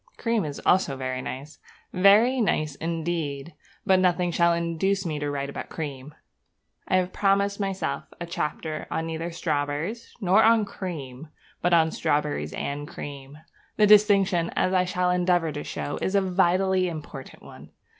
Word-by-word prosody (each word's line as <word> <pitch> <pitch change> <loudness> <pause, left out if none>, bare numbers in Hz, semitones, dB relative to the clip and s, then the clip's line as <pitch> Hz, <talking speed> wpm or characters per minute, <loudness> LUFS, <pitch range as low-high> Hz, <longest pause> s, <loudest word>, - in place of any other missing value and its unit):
Cream 230 -6 0
is 145 -2 -5
also 175 -7 +3
very 130 -1 -3
nice, 140 +4 -7 0.3
very 210 +7 +5
nice 155 -8 0
indeed; 165 -1 -3 0.3
but 190 -1 +4
nothing 180 -1 +2
shall 170 0 +3
induce 170 +4 0
me 155 -3 -2
to 145 0 -2
write 140 -1 -3
about 140 - -7
cream. 145 -2 -6 0.7
I 185 - +3
have 185 0 -1
promised 200 0 +1
myself 195 -1 -2
a 175 - -4
chapter, 155 -2 -4
neither 160 0 -3
on 175 - -4
strawberries 155 +7 -3
nor 200 +1 +4
on 225 -1 +5
cream, 160 -8 -7 0.3
but 175 - +1
on 160 -2 +4
strawberries 150 -2 -1
and 145 +1 -4
cream. 140 0 -9 0.4
The 215 - +5
distinction, 200 -4 +4
as 185 - +1
I 185 -1 +3
shall 180 0 0
endeavour 175 -2 +1
to 145 0 -5
show, 145 - -4
is 190 - -1
a 200 - +4
vitally 185 0 +2
important 150 -4 -9
one. - - -13
170 Hz, 155 wpm, -25 LUFS, 150-190 Hz, 0.7 s, very